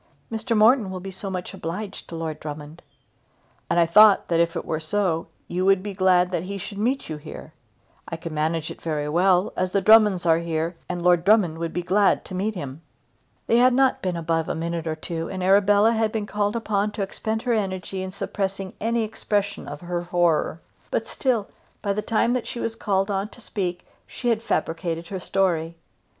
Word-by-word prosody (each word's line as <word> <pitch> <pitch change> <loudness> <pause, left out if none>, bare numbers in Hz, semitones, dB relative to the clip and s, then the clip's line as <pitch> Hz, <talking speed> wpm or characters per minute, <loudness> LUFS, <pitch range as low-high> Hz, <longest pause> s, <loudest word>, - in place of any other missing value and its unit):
"Mr. 225 +1 -1
Morton 220 -1 +5
will 185 -1 -5
be 195 +1 -7
so 195 +1 -5
much 185 -1 -5
obliged 190 +5 -6
to 170 - -6
Lord 160 -2 -4
Drummond." 150 +1 -8 0.9
"And - - +2
I 170 - +5
thought 210 +4 +6
that 165 -1 +2
if 170 0 +2
it - - -3
were 155 - -2
so, 165 0 -1 0.2
you 180 +1 -2
would 195 0 +4
be 205 -1 -4
glad 185 -1 +3
that 175 - -1
he 200 +3 -5
should 200 +1 -7
meet 255 +6 0
you 155 - -5
here. 150 +1 -10 0.5
I 165 - -5
could 165 0 -7
manage 155 +1 -1
it - - -11
very 150 -3 -2
well, 180 +4 +3
as 185 0 0
the 200 - +1
Drummonds 210 -3 +5
are 165 -1 +4
here, 165 0 -2
and 175 -1 -3
Lord 175 -1 +4
Drummond 185 -6 +3
would 165 -1 -3
be 175 - -3
glad 195 +3 +2
to - - -9
meet 205 +4 -1
him." 140 -3 -6 0.6
They 230 - +3
had 250 +1 +5
not 265 0 +3
been 180 -2 -2
above 165 -1 -1
a - - -1
minute 165 0 -3
or 160 - -1
two 165 +1 -4
together, - - -7
and 185 -1 -4
Arabella 200 +3 +5
had 220 -1 +1
been 215 -2 -2
called 205 +1 -1
upon 210 -3 0
to 205 - -2
expend 220 +3 -3
her 245 - +1
energy 190 -3 -2
in 190 - -4
suppressing 195 0 -4
any 230 +1 +1
expression 205 -2 -2
of 145 +1 -7
her 175 0 -3
horror; 175 -2 +1 0.3
but - - -1
still, 240 -7 -1 0.4
by 200 -2 +1
the 210 - -2
time 230 +2 +1
that 250 -2 -2
she 245 - -5
was 225 -1 -3
called 195 -2 0
on 195 +1 -1
to 245 - -16
speak, 180 -6 -4 0.2
she 245 - -3
had 225 -2 +1
fabricated 165 -3 -2
her 190 - -4
story. 170 -3 0
190 Hz, 210 wpm, -24 LUFS, 170-210 Hz, 0.9 s, thought